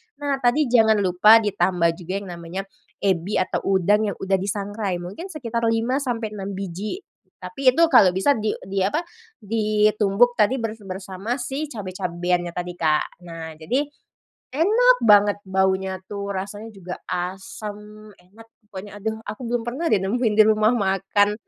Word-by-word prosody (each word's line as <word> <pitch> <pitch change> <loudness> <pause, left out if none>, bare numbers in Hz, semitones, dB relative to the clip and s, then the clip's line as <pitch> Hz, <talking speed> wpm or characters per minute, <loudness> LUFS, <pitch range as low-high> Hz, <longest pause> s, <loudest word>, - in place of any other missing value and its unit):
Nah 285 0 -2
tadi 245 +4 +2
jangan 220 -3 +5
lupa 210 +5 +6
ditambah 185 -4 +1
juga 180 +2 -6
yang - - -10
namanya 170 +2 -6 0.4
ebi 190 +1 0
atau 185 - 0 0.2
udang 205 +4 +3
yang 200 - -3
udah 195 0 0
disangrai, 200 0 -3
mungkin 265 - -7
sekitar 235 -9 -4
5 230 +4 +1
sampai 230 -5 -3
6 200 -1 -6
biji. 195 - -5 0.3
Tapi 275 -3 -5
itu 335 - +4
kalau 185 -2 +6
bisa 195 +10 +3
di 215 -4 0
di 195 +1 -3
apa 205 - 0 0.3
di 215 -1 +1
tumbuk 220 +4 +3
tadi 215 +5 +4
ber 230 -4 -2 0.2
bersama 190 +4 -4
si 270 +4 -4
cabe-cabean 180 - -2
nya 170 - -9
tadi, 180 0 -4
Kak. 155 0 0
Nah, 165 -1 -7
jadi 250 - 0 0.7
enak 450 - +4
banget 205 -2 +5
baunya 190 0 +1
tuh, 200 0 -6
rasanya 200 +3 -5
juga 190 -4 -8 0.2
asem 210 +3 -6
enak. 205 +6 -17 0.2
Pokoknya 205 +1 -9
aduh 220 +1 -2
aku 215 - -7
belum 240 -1 -1
pernah 275 +8 -2
deh 215 - +4
nemuin 210 +3 0
di 215 - +9
rumah 215 0 +4
makan. 195 +1 +1
205 Hz, 160 wpm, -23 LUFS, 190-230 Hz, 0.7 s, di